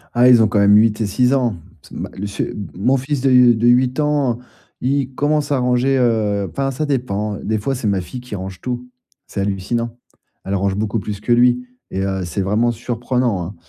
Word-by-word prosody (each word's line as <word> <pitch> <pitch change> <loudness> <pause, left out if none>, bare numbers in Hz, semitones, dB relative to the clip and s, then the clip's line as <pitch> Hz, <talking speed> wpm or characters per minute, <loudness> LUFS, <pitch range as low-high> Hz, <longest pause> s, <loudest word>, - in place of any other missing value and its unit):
Ah, 120 +1 +5
ils 120 -2 +7
ont 110 - +5
quand 105 - +1
même 100 0 +6
8 105 0 +4
et - - +1
6 125 +6 +2
ans. 125 -6 +1 0.3
C'est - - -17
ma - - -5
le 100 - -7
ch 100 - -3
m 100 -3 -6
mon 125 +9 +2
fils 135 +1 -2
de, 135 - +2
heu, 125 -2 +6
de 115 +2 +1
8 125 +2 +3
ans, 145 -5 +1 0.4
il 135 0 0
commence 145 0 0
à 140 - +2
ranger, 125 +2 +2
heu, 110 -5 +1
enfin, 135 0 -2
ça 135 +4 -2
dépend. 105 -7 -2
Des 110 +1 0
fois, 135 +6 -2
c'est 120 -4 -3
ma 100 -2 +1
fille 125 +8 -8
qui 125 -4 -7
range 95 -1 -7
tout. 125 0 -5 0.4
C'est 100 - -4
hallucinant. 115 +5 -2 0.5
Elle 100 - -1
range 100 0 0
beaucoup 110 +2 -1
plus 105 0 -5
que 120 - -3
lui 125 +1 +3 0.2
et 95 - -2
heu, 95 -1 -2
c'est 85 +3 -3
vraiment 105 +5 +1
surprenant, 120 -2 -1
hein. 95 +5 -7
120 Hz, 225 wpm, -19 LUFS, 100-125 Hz, 0.5 s, ils